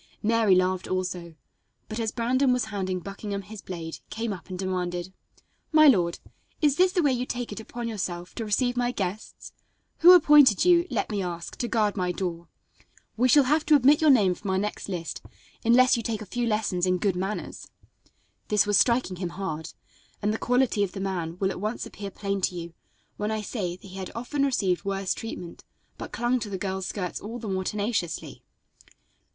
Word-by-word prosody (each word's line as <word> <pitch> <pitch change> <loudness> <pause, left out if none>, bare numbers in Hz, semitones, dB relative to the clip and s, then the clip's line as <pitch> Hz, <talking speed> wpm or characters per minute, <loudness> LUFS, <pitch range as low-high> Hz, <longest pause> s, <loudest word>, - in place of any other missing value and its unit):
Mary 220 -3 +4
laughed 185 0 +1
also, 180 -3 -3 0.5
but, 215 +1 -5
as 225 -1 -1
Brandon 255 +3 +2
was 250 0 +1
handing 190 -2 -2
Buckingham 200 +1 -5
his 205 +1 -10
blade, 165 -3 -7
came 225 -1 -3
up 180 -1 -11
and 185 - -5
demanded: 180 -1 -3 0.6
"My 310 -1 +7
lord, 175 -10 +4 0.4
is 290 -3 +2
this 365 0 +4
the 360 -2 +1
way 280 -3 +3
you 250 +1 -2
take 245 -2 -4
it 205 - -6
upon 235 +2 -6
yourself 180 -5 -4
to 230 - -4
receive 245 +4 +1
my 245 0 +1
guests? 200 -2 -5 0.5
Who 355 +2 +9
appointed 295 - +6
you, 350 0 +5
let - - -2
me 205 -2 -1
ask, 175 -2 -5
to 240 - -2
guard 215 -4 +1
my 180 -2 0
door? 170 -2 -4 0.7
We 245 +3 +3
shall 285 +3 +6
have 300 +4 +2
to 305 - +6
omit 285 +2 +5
your 310 - +5
name 210 -9 +5
from 195 +3 -7
our 190 - +1
next 205 +1 -3
list, 170 -3 -4 0.4
unless 255 +2 +5
you - - -2
take 220 -1 -3
a - - -10
few 240 +4 -2
lessons 205 -5 0
in 180 0 +2
good 190 0 0
manners." 190 +4 -4 0.8
This 210 -1 +3
was 205 -1 +4
striking 235 -7 +2
him 180 -1 -3
hard, 165 -3 -5 0.5
and 210 +1 0
the 220 - -3
quality 245 -4 +2
of 190 - -3
the 195 - -6
man 180 -4 -3
will 190 0 0
at - - -7
once 215 +3 -3
appear 200 -1 -7
plain 200 0 -3
to 180 - 0
you 170 -1 -6 0.4
when 210 +1 -2
I 220 -1 -2
say 190 -6 -3
that 185 - -17
he 190 0 -10
had 190 -1 -5
often 275 +4 -1
received 195 -10 0
worse 195 -1 -1
treatment, 180 -6 -8 0.4
but - - -7
clung 240 +1 0
to 220 - -5
the 195 - -3
girl's 190 0 -3
skirts 180 -4 -4
all 225 +4 -6
the 230 -2 -7
more 190 -1 -1
tenaciously. 205 -6 -2
205 Hz, 200 wpm, -26 LUFS, 185-240 Hz, 0.8 s, Who